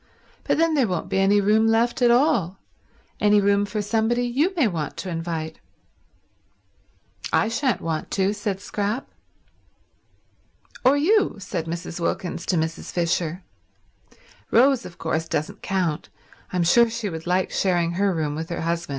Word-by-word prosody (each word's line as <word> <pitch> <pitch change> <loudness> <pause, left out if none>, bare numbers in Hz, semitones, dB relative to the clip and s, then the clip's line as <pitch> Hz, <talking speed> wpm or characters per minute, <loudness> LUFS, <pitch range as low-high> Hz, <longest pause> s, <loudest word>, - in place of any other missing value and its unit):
But - - +1
then 330 0 +2
there 270 -6 +2
won't 180 -3 -3
be 190 - 0
any 200 +2 +4
room 215 +2 +3
left 230 +2 +1
at 240 - +5
all— 235 - +2 0.6
any 210 0 +4
room 200 0 +2
for 210 0 -3
somebody 225 +3 +1
you 275 +10 +1
may 300 -9 +3
want 165 -7 -4
to 185 - -5
invite." 165 -1 -4 1.7
"I - - +3
shan't 230 - 0
want 160 -1 -3
to," 195 +1 +1
said 205 -2 -3
Scrap. 210 +5 -3 1.8
"Or 260 +3 +5
you," 395 +8 +3
said 185 -4 -4
Mrs. 170 +1 -5
Wilkins 170 0 -3
to 185 - +1
Mrs. 160 +1 -3
Fisher. 170 0 -1 1.1
"Rose, 260 +1 +4
of 170 - -14
course, 160 +1 -2
doesn't 155 -1 -3
count. 180 -6 -2 0.4
I'm 180 -2 +1
sure 235 +7 +5
she 225 -1 -3
would 165 -2 -6
like 180 +1 +1
sharing 175 -3 +1
her 195 +3 +1
room 155 -4 -1
with 160 +3 -5
her 170 - -3
husband. 170 0 -2
195 Hz, 155 wpm, -23 LUFS, 170-230 Hz, 1.8 s, at